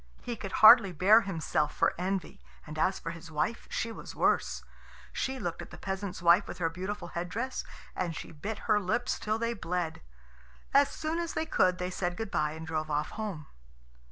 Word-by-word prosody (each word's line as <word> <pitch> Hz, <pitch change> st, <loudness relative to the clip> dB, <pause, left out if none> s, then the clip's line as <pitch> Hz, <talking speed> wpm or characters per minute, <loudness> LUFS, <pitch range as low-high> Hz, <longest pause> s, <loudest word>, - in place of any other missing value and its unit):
He 240 Hz, -, -3 dB
could 195 Hz, -3 st, -7 dB
hardly 220 Hz, -4 st, +10 dB
bear 200 Hz, +7 st, +6 dB
himself 160 Hz, -6 st, -1 dB
for -, -, +3 dB
envy, 185 Hz, +1 st, -3 dB, 0.2 s
and 155 Hz, 0 st, -7 dB
as 190 Hz, +4 st, +2 dB
for 165 Hz, -, -5 dB
his 165 Hz, 0 st, -10 dB
wife, 155 Hz, +9 st, -2 dB
she 230 Hz, -, -2 dB
was -, -, -9 dB
worse. -, -, +1 dB, 0.5 s
She 265 Hz, 0 st, -2 dB
looked 175 Hz, -9 st, -4 dB
at -, -, -9 dB
the -, -, -11 dB
peasant's 190 Hz, -2 st, -4 dB
wife 175 Hz, +4 st, +6 dB
with -, -, -7 dB
her 165 Hz, -2 st, 0 dB
beautiful 185 Hz, +1 st, -5 dB
head 175 Hz, +1 st, -4 dB
dress, 255 Hz, +6 st, -3 dB, 0.3 s
and 175 Hz, -3 st, -2 dB
she -, -, -7 dB
bit 200 Hz, +8 st, -5 dB
her 210 Hz, -2 st, +4 dB
lips 240 Hz, +6 st, -1 dB
till 215 Hz, +1 st, -1 dB
they 230 Hz, +1 st, -1 dB
bled. 180 Hz, -5 st, -3 dB, 0.7 s
As 280 Hz, +1 st, +6 dB
soon 320 Hz, +2 st, -3 dB
as 340 Hz, -1 st, -3 dB
they 320 Hz, -, 0 dB
could, 185 Hz, -, +2 dB
they 180 Hz, 0 st, -3 dB
said 175 Hz, -1 st, -2 dB
good 225 Hz, -3 st, -4 dB
bye 150 Hz, 0 st, 0 dB
and 160 Hz, 0 st, -7 dB
drove 155 Hz, -1 st, -2 dB
off 150 Hz, 0 st, -1 dB
home. 200 Hz, -8 st, -5 dB
185 Hz, 200 wpm, -30 LUFS, 165-220 Hz, 0.7 s, hardly